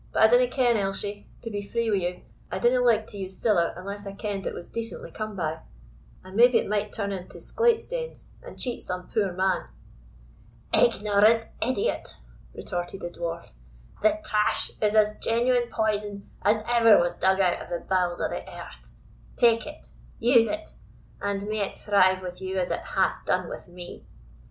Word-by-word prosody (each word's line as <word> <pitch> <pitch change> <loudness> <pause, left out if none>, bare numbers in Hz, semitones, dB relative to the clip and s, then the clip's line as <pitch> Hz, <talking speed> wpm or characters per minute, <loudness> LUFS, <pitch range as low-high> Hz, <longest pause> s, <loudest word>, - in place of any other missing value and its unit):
But - - +3
I - - +10
dinna - - +5
ken, 245 -4 +2
Elshie; 200 +1 -3 0.2
to 230 - -5
be 205 -1 -3
free 230 +2 -1
wi' 205 - +3
you, 180 -1 -2 0.3
I - - -2
dinna 250 +1 +3
like 230 -3 +3
to 205 - -10
use 190 -1 -6
siller 185 -7 +2
unless 200 +2 -7
I 195 - -6
kend 200 -1 -4
it - - -3
was 175 - -8
decently 230 0 -6
come 215 -1 -5
by; 160 -3 -2 0.6
and 185 +1 -11
maybe 240 +2 +6
it - - -1
might 210 0 -1
turn 200 -2 -3
into 185 -2 -7
sclate 465 -1 +1
stanes, - - -6
and - - -11
cheat 245 -2 -3
some 180 0 -6
poor 200 -4 0
man." 185 0 0 1.1
"Ignorant 215 0 +4 0.2
idiot!" 260 - -1 0.4
retorted 175 +2 -5
the 175 - -4
Dwarf; 170 0 -5 0.5
"the 215 +9 +3
trash 210 -6 +1
is 210 0 +2
as 215 0 +3
genuine 240 +1 +2
poison 205 -2 -2
as 215 +1 +2
ever 230 -2 +6
was 175 0 0
dug 190 +2 +2
out 185 -2 +2
of - - -9
the 175 - -3
bowels 180 -2 +1
of - - -1
the - - -3 0.2
earth. - - -10 0.5
Take 230 0 +3
it 300 +1 -11 0.3
use 235 -1 +5
it, 315 +1 -5 0.5
and 200 0 -2
may 215 0 -2
it 200 - -2
thrive 185 -2 +3
with 180 0 -7
you 190 0 -3
as 180 -1 0
it - - -1
hath - - 0
done - - +1
with - - -8
me!" 175 0 -10
205 Hz, 185 wpm, -26 LUFS, 185-230 Hz, 1.1 s, I